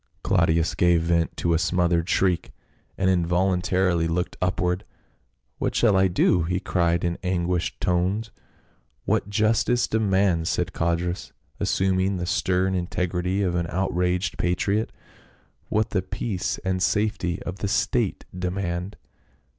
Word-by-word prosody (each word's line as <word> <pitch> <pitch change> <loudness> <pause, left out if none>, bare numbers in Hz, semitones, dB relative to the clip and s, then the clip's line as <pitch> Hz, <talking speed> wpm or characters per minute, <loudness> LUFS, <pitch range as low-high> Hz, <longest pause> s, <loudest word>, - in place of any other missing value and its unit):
Claudius 80 0 +2
gave 85 -2 +3
vent 85 -1 0
to 85 - +1
a 80 - +2
smothered 85 0 +1
shriek 90 -3 +1 0.5
and 95 - +1
in 90 -2 +3
voluntarily 90 -1 +1
looked 90 +2 -2
upward. 90 0 0 0.8
"What - - -1
shall 110 -4 +4
I 95 0 +4
do?" 90 0 +2
he 90 +3 -1
cried 85 -2 0
in 85 0 -1
anguished 90 -2 -1
tones. 95 +5 0 0.7
"What 100 - 0
justice 110 +3 +2
demands," 95 -6 +1
said 90 0 -1
Codrus, 85 +1 -2 0.3
assuming 95 0 +1
the 90 - -3
stern 95 +2 +1
integrity 90 +1 -1
of 90 -2 0
an 85 -1 -1
outraged 90 0 -1
patriot. 100 +5 0 0.4
" - - -36
What 110 0 0
the 95 - +1
peace 95 -1 -3
and 95 0 0
safety 100 -4 0
of 90 +1 -5
the 100 - -2
state - - 0
demand." 90 +1 -3
90 Hz, 135 wpm, -24 LUFS, 85-95 Hz, 0.8 s, shall